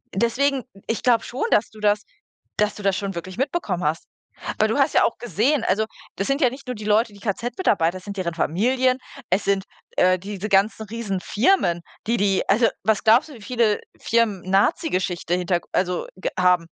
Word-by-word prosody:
deswegen 260 +5 +1 0.2
ich 225 - -2
glaube 235 -2 +4
schon, 250 - -3
dass 210 - +3
du 215 - -15
das 210 0 +2 0.6
dass 210 0 +1
du 205 - -9
das 195 -1 +2
schon 195 -3 -4
wirklich 185 +4 -7
mitbekommen 260 - -1
hast. 155 +2 -1 0.5
Weil - - +3
du - - 0
hast - - +3
ja - - +5
auch - - +1
gesehen 240 - +1
also 210 +4 +2 0.3
das 195 - -2
sind 275 +2 0
ja 255 - +5
nicht 270 +3 -11
nur 250 - -3
die 210 -1 -8
Leute, 215 +1 +2
die 200 - -14
KZ-Mitarbeiter, 200 - 0
es 185 - -18
sind 200 0 -7
deren 175 -3 -2
Familien, 255 - +1 0.3
es 190 +3 +1
sind, 195 0 +1 0.3
äh, 185 0 +4
diese 200 +2 -5
ganzen 200 +3 +2
Riesenfirmen, 205 - +1 0.3
die 235 - +2
die 195 -1 +2
also, 230 +2 +5 0.2
was 220 -2 +1
glaubst 230 +7 +5
du, - - -10
wie 230 - -13
viele 230 -2 +1 0.2
Firmen 225 -4 +1
Nazigeschichte 190 - +1
Hinterg 180 -1 -1
also 180 -1 0
g 185 - -2
haben? 180 0 +5
210 Hz, 195 wpm, -23 LUFS, 185-235 Hz, 0.6 s, ja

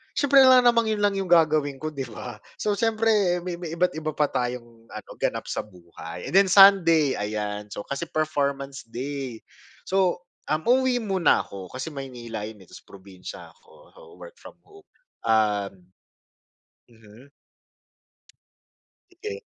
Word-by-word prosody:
siyempre 280 -1 +4
alangan 255 -2 +7
namang 230 -1 +2
yun 210 -1 -2
lang 205 -1 +2
yung 190 - -3
gagawin 155 -4 +3
ko, 155 - -3
di 140 -3 -5
ba? 120 0 -8 0.2
So, 210 - 0
siyempre 215 -5 +1
may 180 -1 -4
may 170 -2 -6
iba't 180 +1 +1
iba 155 0 -4
pa 150 -1 +1
tayong 120 -2 -4
ano, 110 - -10
ganap - - -2
sa - - -3
buhay. 85 -2 -10
And - - -9
then 195 -1 +6
Sunday, 165 -7 +6
ayan. 105 0 -4
So, 105 - -6
kasi 140 +8 -5
performance 140 -4 -2
day. 130 -1 -6 0.4
So, 185 -2 0 0.3
um, 155 +1 0
uuwi 255 0 +3
muna 190 -6 +2
ako 95 0 -10
kasi 130 +4 -5
Maynila 120 -6 -7
yun, 105 -3 -12
eh, - - -22
tapos - - -14
probinsiya 95 -1 -11
ako. - - -22
So, - - -14 0.2
work - - -12
from - - -13
home, 405 -1 -19 0.4
um 105 -3 +1 1.2
mhm. 115 +4 -18 1.8
Sige. 430 +5 -7
145 Hz, 150 wpm, -25 LUFS, -, 1.8 s, alangan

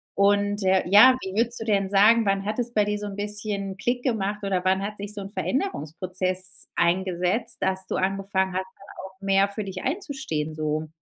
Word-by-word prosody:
Und, 205 +1 +2
äh, 185 0 +3
ja, 215 +7 +7
wie 190 +1 -6
würdest 235 0 +1
du 225 - -4
denn 200 -3 +1
sagen, 215 +3 +5
wann 195 0 0
hat 215 +2 -3
es 240 0 0
bei 210 -1 +2
dir 210 0 -1
so 210 - -5
'n 195 - -7
bisschen 205 -1 -1
Klick 245 +4 -2
gemacht 210 -4 -2
oder 190 -2 -1
wann 190 +1 +2
hat 210 +1 -5
sich 205 +1 -3
so 205 - -4
'n 195 - -7
Veränderungsprozess 185 - -1
eingesetzt, 185 +6 0
dass 190 0 0
du - - -3
angefangen 190 0 -1
hast, 185 +1 -2
dann - - -17 0.2
auch 190 0 -14
mehr 195 0 +2
für 210 +1 -3
dich 185 -1 -7
einzustehen 265 - -3
so? 155 0 -2
195 Hz, 200 wpm, -24 LUFS, 190-210 Hz, 0.2 s, ja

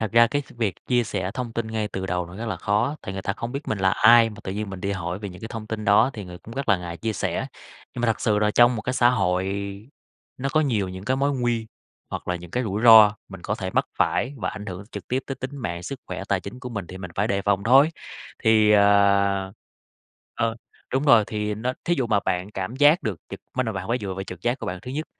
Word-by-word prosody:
Thật 110 0 -2
ra 115 0 +7
cái 145 +3 -1
s - - -18
việc 105 -6 0
chia 120 -2 +2
sẻ 95 -2 -3
thông 125 -3 -4
tin 115 -1 -2
ngay 110 -1 -2
từ 95 -1 -4
đầu 90 -1 -1
nó 90 +2 -11
rất 115 - -5
là 105 -5 -2
khó, 105 - 0
tại 95 - -5
người 95 - -5
ta 100 - -1
không 115 +3 -6
biết 140 +2 -5
mình 110 - -1
là 95 0 +3
ai 115 +3 +6
mà 105 - -11
tự 95 - -3
nhiên 105 0 -4
mình 95 -2 -7
đi 100 +1 -1
hỏi 90 0 -4
về 105 - -6
những 90 -1 -11
cái 115 - -6
thông 110 -2 -7
tin 110 -1 -4
đó 105 +5 +5
thì 105 -3 -6
người 90 -1 -10
cũng 115 +5 -12
rất 135 -3 -4
là 100 - +5
ngại 85 -1 -6
chia 110 -1 -2
sẻ. 95 - -2 0.5
Nhưng 125 - -4
mà 120 - +2
thật 115 - 0
sự 105 -2 +2
là 105 0 +2
trong 120 +2 +5
một 110 - -4
cái 125 - -2
xã 120 -1 +5
hội 95 -6 +1 0.9
nó 135 +2 -1
có 155 - +4
nhiều 115 -10 0
những 95 +1 -8
cái 130 +2 +1
mối 140 +1 +1
nguy 120 -3 -1 0.4
hoặc - - -6
là 90 - 0
những 85 0 -11
cái 125 +6 -1
rủi 105 0 -2
ro 110 -3 +8
mình 95 -2 -10
có 110 - -2
thể 95 -3 -4
mắc - - +1
phải 135 +4 +1
và - - -2
ảnh 105 0 -8
hưởng 95 0 -6
trực - - -8
tiếp 130 +2 0
tới 135 - -3
tính 135 +2 -7
mạng, 85 -9 -4
sức 130 +8 -6
khỏe, - - -5
tài 100 -2 +1
chính 110 +7 -9
của 125 - -6
mình 100 -6 -5
thì 95 - -9
mình 90 -2 -7
phải 105 +3 0
đề 100 -2 0
phòng 100 -1 +1
thôi. 135 +6 +6 0.6
Thì, 110 -1 +5
ờ 100 -1 +4 0.8
ờ, 115 0 -1 0.4
đúng 135 +3 +1
rồi, 120 -7 +6
thì 105 -1 -2
nó 120 +4 -2
thí 175 - +2
dụ 130 -7 -1
mà 100 - +2
bạn 90 +3 -1
cảm 105 +4 -5
giác 145 +5 +5
được 110 -6 -2
trực - - -7 0.2
mới 130 - +1
đầu 110 -3 -3
bạn 95 +1 -5
phải 120 +2 +1
dựa 95 -4 -4
vào 95 +1 -5
trực 90 -3 -9
giác 120 +3 0
của - - -6
bạn 90 - -3
thứ 125 - -7
nhất. 150 +4 -3
105 Hz, 285 wpm, -24 LUFS, 95-120 Hz, 0.9 s, ro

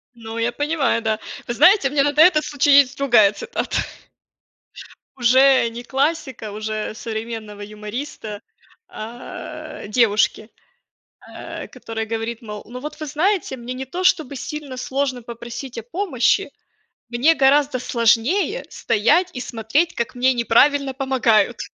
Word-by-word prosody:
Ну, 225 -1 -8
я 230 +1 0
понимаю, 290 -3 0
да. 220 -1 0 0.3
Вы 240 - -3
знаете, 360 - +5
у - - -10
меня 285 -1 +3
на 290 - +1
да 300 +2 +5
этот 320 -3 +5
случай 290 -1 +1
есть 275 -3 +3
другая 240 -7 +5
цитата. 200 - -4 1.4
Уже 260 0 +5
не 235 +1 -8
классика, 270 -5 -2
уже 215 0 -4
современного 220 -2 -6
юмориста. 210 +1 -7 0.5
А, 225 -1 -8
девушке, 215 -1 +1 0.7
а, - - -9
которая 225 -1 -6
говорит, 225 +1 -4
мол, 210 -2 -8
ну 250 +2 -8
вот 300 +4 -8
вы 310 - -4
знаете, 315 0 0
мне 245 +1 -6
не 265 +1 -5
то 350 +8 -5
чтобы 315 -6 +2
сильно 290 0 -6
сложно 260 0 -2
попросить 235 +2 -8
о 230 - -5
помощи, 260 - 0 0.6
мне 255 +7 +3
гораздо 280 -1 +3
сложнее 245 - +1
стоять 305 - +2
и - - -5
смотреть, 255 +9 -1
как 235 +2 -3
мне 255 +1 +3
неправильно 265 +4 +3
помогают. 245 -5 +2
250 Hz, 140 wpm, -21 LUFS, 225-285 Hz, 1.4 s, знаете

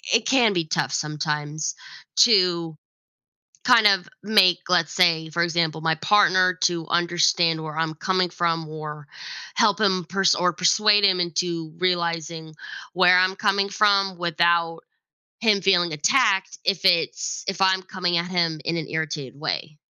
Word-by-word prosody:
it 230 -1 0
can 245 -5 +3
be 170 -2 -1
tough 155 - -2
sometimes 150 0 -3 0.4
to 180 -7 +3 0.9
kind 235 -4 +5
of 195 -3 +2
make, 195 -4 +4
let's 170 -3 +1
say, 165 -3 +2
for 170 +2 -1
example, 165 -2 -1
my 160 0 +1
partner 185 -1 +2
to 170 -2 -1
understand 170 -1 +1
where 155 -1 -8
I'm 160 0 -2
coming 185 +2 -1
from 165 -2 -2
or 150 -1 -9 0.5
help 210 -3 +2
him 185 -5 0
pers 190 -1 +2
or 180 0 0
persuade 205 +4 +3
him 185 -2 +3
into 170 -2 -3
realizing 170 -3 -3 0.4
where 180 0 +5
I'm 185 +1 +1
coming 200 -1 0
from 200 -2 +1
without 170 -1 0 0.6
him 215 -3 +2
feeling 175 -3 +1
attacked 190 - +1
if 190 -2 0
it's 175 -3 0
if 195 -2 -4
I'm 190 0 +2
coming 180 -2 -3
at 170 +1 -3
him 170 -3 -1
in 165 - -2
an 160 - -6
irritated 145 -4 -5
way. 155 0 -4
175 Hz, 150 wpm, -22 LUFS, 160-190 Hz, 0.9 s, kind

